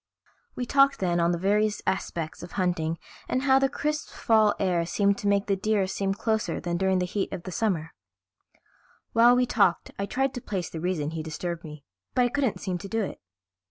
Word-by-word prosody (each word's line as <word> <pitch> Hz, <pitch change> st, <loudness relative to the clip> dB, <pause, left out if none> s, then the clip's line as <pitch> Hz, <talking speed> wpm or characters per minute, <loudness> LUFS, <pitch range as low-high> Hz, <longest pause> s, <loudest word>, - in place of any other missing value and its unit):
We 245 Hz, -, -2 dB
talked 275 Hz, +2 st, +4 dB
then 175 Hz, -2 st, 0 dB
on 170 Hz, 0 st, +3 dB
the 175 Hz, -, 0 dB
various 210 Hz, +3 st, +1 dB
aspects 165 Hz, -4 st, -2 dB
of 175 Hz, -, -9 dB
hunting 170 Hz, -4 st, 0 dB, 0.3 s
and 255 Hz, -, 0 dB
how 270 Hz, -1 st, +5 dB
the 270 Hz, 0 st, +2 dB
crisp 300 Hz, +1 st, -2 dB
fall 220 Hz, -2 st, +3 dB
air 180 Hz, -3 st, +1 dB
seemed 200 Hz, +4 st, +1 dB
to 205 Hz, -, -2 dB
make 200 Hz, 0 st, +2 dB
the 200 Hz, -, +1 dB
deer 205 Hz, 0 st, +1 dB
seem 195 Hz, +1 st, -1 dB
closer 220 Hz, 0 st, -1 dB
than 175 Hz, -1 st, -2 dB
during 190 Hz, +1 st, +2 dB
the 180 Hz, -, +1 dB
heat 195 Hz, +2 st, -2 dB
of 170 Hz, -, -5 dB
summer. 165 Hz, -6 st, -1 dB, 1.2 s
While 235 Hz, +2 st, +6 dB
we 250 Hz, 0 st, +3 dB
talked 200 Hz, -7 st, +2 dB
I 200 Hz, -, -1 dB
tried 270 Hz, +3 st, 0 dB
to 245 Hz, -, -5 dB
place 190 Hz, -6 st, -4 dB
the 160 Hz, -, -5 dB
reason 165 Hz, -4 st, -1 dB
he 160 Hz, -1 st, -4 dB
disturbed 165 Hz, +2 st, -4 dB
me, 150 Hz, -3 st, -10 dB, 0.3 s
but 250 Hz, -, +4 dB
I 245 Hz, -, +2 dB
couldn't 265 Hz, -3 st, 0 dB
seem 185 Hz, -3 st, -2 dB
to 200 Hz, -, -7 dB
do 225 Hz, +1 st, 0 dB
it. -, -, -6 dB
195 Hz, 205 wpm, -27 LUFS, 175-225 Hz, 1.2 s, While